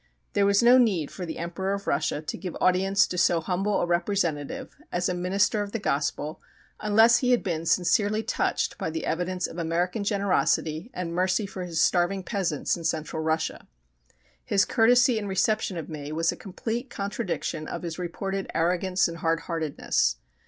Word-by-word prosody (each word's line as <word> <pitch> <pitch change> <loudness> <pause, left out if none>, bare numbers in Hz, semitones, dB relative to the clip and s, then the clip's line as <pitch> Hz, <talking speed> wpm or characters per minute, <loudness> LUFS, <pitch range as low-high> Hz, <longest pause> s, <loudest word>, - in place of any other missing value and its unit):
There 200 0 +3
was 200 +3 +4
no 245 +2 +7
need 190 - +2
for 180 -2 -6
the 160 - -5
Emperor 175 +3 -3
of 200 - -7
Russia 150 +1 0
to - - -4
give 180 -3 -5
audience 190 +2 +3
to 180 - -3
so 170 -1 +4
humble 190 +5 0
a - - +1
representative 175 - -1 0.2
as 175 0 0
a - - 0
minister 190 +4 +1
of 205 0 -5
the - - 0
Gospel 150 -4 -2 0.4
unless 225 +3 +5
he 250 - 0
had 245 -1 +3
been 165 -4 -2
sincerely 205 +6 +2
touched - - -1
by - - -2
the 160 0 -4
evidence 180 +2 -1
of 170 - -6
American 175 +5 -1
generosity 195 -3 0
and 170 -2 -4
mercy 185 +3 +1
for 185 -2 -6
his 165 -2 -3
starving 185 +3 +2
peasants 180 -8 -1
in 170 - -8
Central 160 0 -2
Russia. 160 0 -2 0.8
His 200 -1 +2
courtesy 245 +1 +4
and 205 -2 -5
reception 190 -1 0
of 165 - -5
me 150 -2 -6
was 165 +1 +1
a - - -6
complete 225 +6 -5
contradiction 200 -7 -3
of - - -5
his 170 0 -5
reported 195 +2 -3
arrogance 180 +3 +2
and 170 0 -6
hard 165 0 0
heartedness. 160 - 0
180 Hz, 180 wpm, -26 LUFS, 165-200 Hz, 0.8 s, no